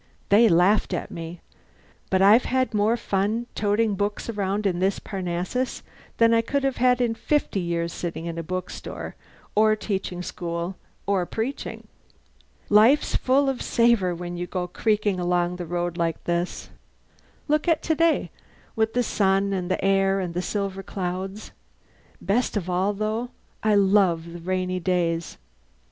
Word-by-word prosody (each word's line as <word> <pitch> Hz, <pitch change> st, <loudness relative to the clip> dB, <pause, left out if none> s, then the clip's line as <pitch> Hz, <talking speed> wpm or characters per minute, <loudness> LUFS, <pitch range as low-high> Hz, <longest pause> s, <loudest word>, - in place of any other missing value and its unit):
They 220 Hz, +3 st, +6 dB
laughed 180 Hz, +2 st, +3 dB
at -, -, -5 dB
me. 165 Hz, +1 st, -7 dB, 0.7 s
But 190 Hz, 0 st, +3 dB
I've 215 Hz, +5 st, +6 dB
had 255 Hz, -1 st, 0 dB
more 215 Hz, +3 st, +2 dB
fun 210 Hz, +2 st, -1 dB
toting 210 Hz, +1 st, +1 dB
books 205 Hz, +3 st, -2 dB
around 205 Hz, 0 st, -2 dB
in 180 Hz, -3 st, +1 dB
this 190 Hz, +2 st, +1 dB
Parnassus 185 Hz, +6 st, -3 dB, 0.3 s
than 230 Hz, 0 st, +5 dB
I 230 Hz, -, +4 dB
could 275 Hz, +4 st, -1 dB
have 270 Hz, -1 st, 0 dB
had 250 Hz, 0 st, +3 dB
in 235 Hz, -2 st, +1 dB
fifty 290 Hz, -3 st, 0 dB
years 170 Hz, -1 st, -2 dB
sitting 170 Hz, -1 st, -5 dB
in 170 Hz, 0 st, -4 dB
a -, -, -1 dB
bookstore, 185 Hz, +2 st, -6 dB, 0.4 s
or 215 Hz, +1 st, +4 dB
teaching 190 Hz, -4 st, -3 dB
school, 170 Hz, +1 st, -4 dB, 0.3 s
or 190 Hz, -3 st, +1 dB
preaching. 235 Hz, +5 st, -4 dB, 0.8 s
Life's 225 Hz, +8 st, +5 dB
full 275 Hz, +2 st, +3 dB
of 270 Hz, -2 st, -1 dB
savour 230 Hz, -7 st, +2 dB
when 175 Hz, 0 st, -6 dB
you 175 Hz, 0 st, -4 dB
go 180 Hz, -1 st, -3 dB
creaking 205 Hz, 0 st, 0 dB
along 175 Hz, 0 st, 0 dB
the 175 Hz, -2 st, -6 dB
road 175 Hz, 0 st, -2 dB
like 165 Hz, -2 st, -1 dB
this. 175 Hz, +1 st, -2 dB, 0.8 s
Look 300 Hz, +1 st, +1 dB
at 330 Hz, -2 st, +2 dB
today, 330 Hz, 0 st, +2 dB, 0.4 s
with 220 Hz, 0 st, 0 dB
the 245 Hz, -, +3 dB
sun 195 Hz, -2 st, +1 dB
and 180 Hz, -2 st, -2 dB
the 185 Hz, -, -1 dB
air 195 Hz, 0 st, +3 dB
and 180 Hz, -3 st, -3 dB
the 180 Hz, -, -1 dB
silver 195 Hz, 0 st, -3 dB
clouds. 190 Hz, +2 st, -5 dB, 0.7 s
Best 215 Hz, +4 st, 0 dB
of 185 Hz, -4 st, -3 dB
all, 190 Hz, +3 st, +1 dB
though, 215 Hz, +4 st, -2 dB, 0.3 s
I 215 Hz, -1 st, +3 dB
love 190 Hz, -4 st, +3 dB
the 175 Hz, -, -7 dB
rainy 185 Hz, +1 st, -2 dB
days. 170 Hz, -2 st, -1 dB
195 Hz, 155 wpm, -24 LUFS, 180-220 Hz, 0.8 s, They